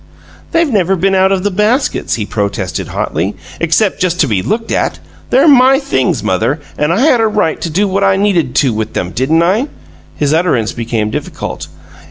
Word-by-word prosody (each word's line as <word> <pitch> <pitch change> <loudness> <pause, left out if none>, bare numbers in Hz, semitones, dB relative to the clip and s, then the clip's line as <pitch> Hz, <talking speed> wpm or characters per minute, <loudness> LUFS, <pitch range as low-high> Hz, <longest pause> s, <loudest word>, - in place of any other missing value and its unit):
"They've 335 0 +2
never 195 -2 +2
been 195 +2 +1
out 190 0 +3
of 190 -1 0
the 205 - 0
baskets," 215 +8 0
he 110 - -3
protested, 100 -2 -3
hotly, 90 +7 -2 0.2
"except 170 +5 +1
just 180 -1 0
to 150 - +3
be 105 -6 0
looked 225 - -2
at. - - 0 0.3
They're 270 +5 +4
MY 265 -2 +6
things, 270 - -1
mother, 115 - 0 0.2
and 150 +2 0
I 190 +7 +1
had 260 -5 +4
a 225 - +3
right 210 -7 0
to 170 - -2
do 195 +6 +1
what 195 +1 0
I 195 -1 +3
needed 185 -10 0
to 125 - +1
with 110 0 -3
'em, 90 - -2
didn't 155 - +1
I?" 205 - +1 0.5
His 145 0 0
utterance 160 -10 +1
became 115 -2 -2
difficult. - - -5
175 Hz, 195 wpm, -13 LUFS, -, 0.5 s, MY